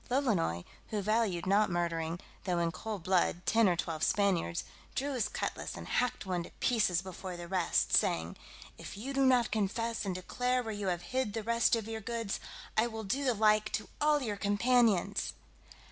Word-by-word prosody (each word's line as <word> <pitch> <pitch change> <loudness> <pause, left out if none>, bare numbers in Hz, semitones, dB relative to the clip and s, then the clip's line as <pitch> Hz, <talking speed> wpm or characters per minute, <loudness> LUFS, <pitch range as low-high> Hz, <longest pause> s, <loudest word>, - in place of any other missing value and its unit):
Lolonois, 210 - +1 0.2
who 215 - -2
valued 210 -3 +1
not 200 +2 +3
murdering, 170 -1 -1 0.3
though 180 -2 0
in 170 -1 +1
cold 210 0 -5
blood, 180 -1 +1
ten 225 -3 +4
or 175 - +2
twelve 165 -2 -3
Spaniards, 185 -4 +1 0.3
drew 280 +1 -1
his 250 -4 0
cutlass, - - -4
and - - -8
hacked 245 -4 0
one 180 -2 -1
to - - -8
pieces 210 -8 +2
before 185 -1 -7
the 175 0 -7
rest, 185 -1 +1
saying, 80 +1 +2 0.4
"If - - -8
you 260 +7 -5
do 275 0 +2
not 250 -3 +4
confess 225 +2 -1
and 190 -3 -2
declare 250 +7 -1
where 220 -1 -4
you 205 -1 -3
have 175 -1 -1
hid 260 -5 0
the 225 - -3
rest 235 +2 +3
of 225 -2 -4
your 225 0 -4
goods, 230 -2 -3 0.4
I 220 +2 +3
will 220 -1 -6
do 260 +8 -1
the 250 -3 +2
like 215 0 +3
to 220 - -2
all 295 -1 +3
your 210 -4 -2
companions." 205 -2 +2
210 Hz, 190 wpm, -32 LUFS, 180-230 Hz, 0.4 s, ten